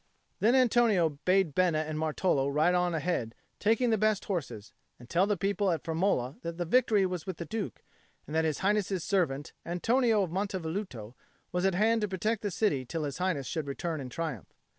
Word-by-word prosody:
Then 230 +5 +4
Antonio 220 - +3
bade 185 -4 +3
Bena 175 -1 +2
and 155 0 -4
Martolo 155 -2 +1
ride 155 +5 +3
on 180 -1 +1
ahead, 150 -8 -2 0.2
taking 230 +3 +2
the 220 - +2
best 215 -1 +1
horses, 135 - -4 0.2
and 120 - -14
tell 175 +7 +2
the 205 -1 +1
people 200 +1 0
at 165 -5 -1
Firmola 160 -6 -1
that 170 0 -5
victory 225 -5 +4
was 180 -2 -4
with 185 -4 -4
the 170 - -5
Duke, 220 0 -5 0.4
and 150 - -6
that 160 - +3
His 155 -3 -1
Highness's 200 -3 +1
servant, 155 -8 0
Antonio 225 +5 +2
of 175 - -4
Monte 195 +1 -1
Velluto, 160 - -5 0.4
was 180 +1 0
at 190 - 0
hand 225 +3 +3
to 210 - +1
protect 210 +3 -1
the 205 - -1
city 175 -8 0
till 155 +6 -4
His 145 +2 -4
Highness 180 -7 0
should 155 +1 -3
return 160 +2 -3
in 130 - -6
triumph. 150 - -5
180 Hz, 195 wpm, -30 LUFS, 155-205 Hz, 0.4 s, Then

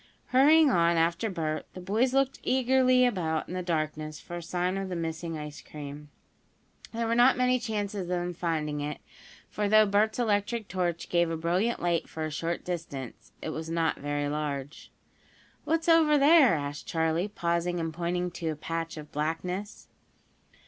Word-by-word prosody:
Hurrying 290 +3 +6
on 170 -3 +3
after 170 +6 +1
Bert, 160 -5 -3
the - - -6
boys 215 +8 +1
looked 270 0 +1
eagerly 255 0 +3
about 165 -9 -1
in - - -7
the 185 - -2
darkness 155 -3 -3
for 175 - -7
a - - -5
sign 180 +2 -1
of 195 -1 -3
the 180 - -3
missing 165 0 -4
ice 150 -1 -7
cream. 150 0 -9 0.8
There 230 0 -2
were 230 - +1
not 245 +2 +5
many 250 0 +3
chances 210 -3 -3
of 180 - -5
them 175 0 -2
finding 155 -3 -2
it, 150 +1 -3 0.5
for 210 -1 -2
though 215 0 +6
Bert's 210 +2 +2
electric 220 -1 0
torch 175 -3 -2
gave 170 -1 +2
a 165 - -2
brilliant 180 +9 0
light 170 -2 0
for 160 -1 -4
a 155 - -4
short 165 +3 -3
distance, 155 -8 -6
it - - -3
was 160 +1 -5
not 165 -1 0
very 145 0 -2
large. 145 -1 -4 0.7
"What's 325 +2 0
over 320 -3 +5
there?" 285 - +6
asked 145 -1 -5
Charley, 160 +3 0
pausing 175 -3 -1
and 165 -1 -3
pointing 175 +1 -2
to 165 -2 -4
a 155 - -2
patch 165 +2 -4
of 150 -1 -9
blackness. 180 +7 -3
175 Hz, 175 wpm, -28 LUFS, 160-215 Hz, 0.8 s, Hurrying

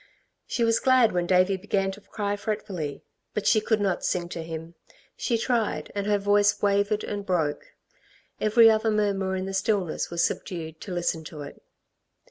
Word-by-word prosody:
She 235 - -1
was 230 0 +3
glad 255 -3 +4
when 175 -1 -1
Davey 185 +1 +3
began 195 0 -1
to 200 +2 -11
cry 205 0 -3
fretfully. 200 -8 -4 0.3
But 210 - -2
she 215 - +4
could 220 0 +1
not 195 -3 0
sing 175 -1 -1
to 170 - -5
him. 165 0 -7 0.4
She 235 - 0
tried, 225 -10 -1
and 200 0 -3
her 205 -1 +3
voice 205 0 +3
wavered 205 +1 +1
and 205 -1 -4
broke. 165 -6 -2 0.6
Every 225 +2 +6
other 220 0 +3
murmur 200 -3 0
in 185 0 -3
the 195 - -5
stillness 190 -3 0
was 170 0 0
subdued 160 -3 -3
to 195 - -7
listen 175 -2 -1
to 150 -2 -8
it. 140 - -11
200 Hz, 175 wpm, -26 LUFS, 175-210 Hz, 0.6 s, Every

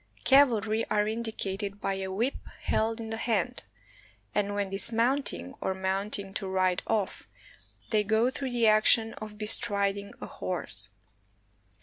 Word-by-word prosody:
Cavalry 230 -5 +4
are 210 0 +1
indicated 205 -3 -3
by 195 - -1
a 190 0 -4
whip 230 +8 0 0.3
held 225 +1 0
in 225 -1 -6
the 225 - -3
hand, 235 +2 -1 0.7
and 205 0 0
when 200 -1 -2
dismounting, 230 - 0
or 190 - -1
mounting 195 +1 -2
to 195 -1 -4
ride 185 -1 +1
off, 215 -4 -2 0.6
they 215 -2 +3
go 220 +4 +2
through 270 0 -4
the 240 -2 +1
action 220 +1 +4
of 215 -1 -8
be 215 - -4
striding 200 -1 +1
a - - -6
horse. 135 - +3
210 Hz, 140 wpm, -28 LUFS, 195-225 Hz, 0.7 s, Cavalry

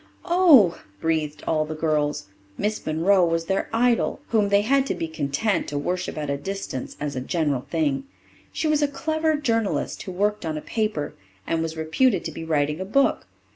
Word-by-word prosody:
"Oh!" 335 - +6 0.2
breathed 155 -2 -1
all 155 -1 +1
the 155 +1 -5
girls. 155 -2 0 0.3
Miss 215 +1 -2
Monroe 175 +5 +3
was 165 -1 +1
their 190 +3 -1
idol, 235 +1 +2
whom 210 -3 +2
they 200 0 +4
had 270 +4 +2
to - - -1
be 165 - -3
content 160 +7 -1
to 145 - -3
worship 180 +5 -2
at 150 -1 -3
a 140 0 -1
distance 195 -6 -5
as 145 -1 -3
a 130 - -2
general 145 -3 -1
thing. 275 -3 0 0.5
She 315 - -1
was 305 -1 +2
a 290 - +3
clever 315 +3 0
journalist, 230 -8 -1
who 185 - -6
worked 205 +3 0
on 160 -2 -2
a - - -4
paper, 210 -10 -2 0.3
and 165 -1 0
was 165 0 -3
reputed 170 +6 +1
to - - -3
be - - -7
writing 150 -1 0
a - - 0
book. 275 - +1
180 Hz, 190 wpm, -24 LUFS, 155-230 Hz, 0.5 s, Oh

